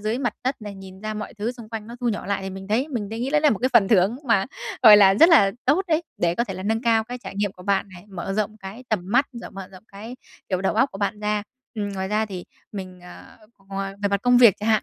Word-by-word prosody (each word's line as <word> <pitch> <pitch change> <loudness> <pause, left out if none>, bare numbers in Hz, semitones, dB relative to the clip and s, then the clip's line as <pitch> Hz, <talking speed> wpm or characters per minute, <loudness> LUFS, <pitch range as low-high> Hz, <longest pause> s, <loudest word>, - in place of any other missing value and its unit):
dưới 215 +4 -2
mặt 240 -6 -1
đất 260 -3 -2
này, 205 -1 -7
nhìn 190 0 -12
ra 215 +1 -4
mọi 210 +2 -6
thứ 220 +3 -3
xung 235 -3 -12
quanh 220 -2 -6
nó 235 +1 -9
thu 245 - 0
nhỏ 210 - -3
lại 200 -1 -2
thì 190 - -5
mình 190 +1 -9
thấy 245 +8 0
mình 230 -8 -4
đấy 225 +2 -6
nghĩ 260 - -2
đấy 300 +1 +3
là 300 -1 +4
một 215 - 0
cái 255 - +1
phần 200 -5 +5
thưởng 200 +2 +3
mà 195 -4 +2 0.4
gọi 210 -1 +10
là 195 -1 +6
rất 325 +11 +7
là 285 - +6
tốt 300 +9 +3
đấy 320 0 +2 0.2
để 170 0 +1
có 235 - 0
thể 195 - -6
là 185 - -7
nâng 225 +3 -1
cao 225 -2 +2
cái 245 +2 -7
trải 235 - -9
nghiệm 205 -1 -1
của 180 - -14
bạn 200 +1 0
này, 175 - -13
mở 195 0 -5
rộng 215 0 -1
cái 200 +6 -10
tầm 215 -4 0
mắt, 245 +8 +2
rồi 235 0 -9
mở 195 -1 -9
rộng 185 +2 -14
cái 220 +5 -10 0.3
kiểu 185 -2 -1
đầu 190 - 0
óc 270 - +3
của 195 - -8
bạn 210 +1 -2
ra. 210 0 -1 0.3
Ừm, 205 -2 -3
ngoài 190 -1 -4
ra 215 +1 0
thì 185 -4 -7 0.3
mình, 185 -2 -8
ờ, 180 0 -14 0.3
ngoài 195 0 -4
về 200 - +2
mặt 200 0 -1
công 245 0 +4
việc 235 -6 +7
chả 210 - -3
hạn, 220 -2 +3
210 Hz, 295 wpm, -23 LUFS, 195-235 Hz, 0.4 s, gọi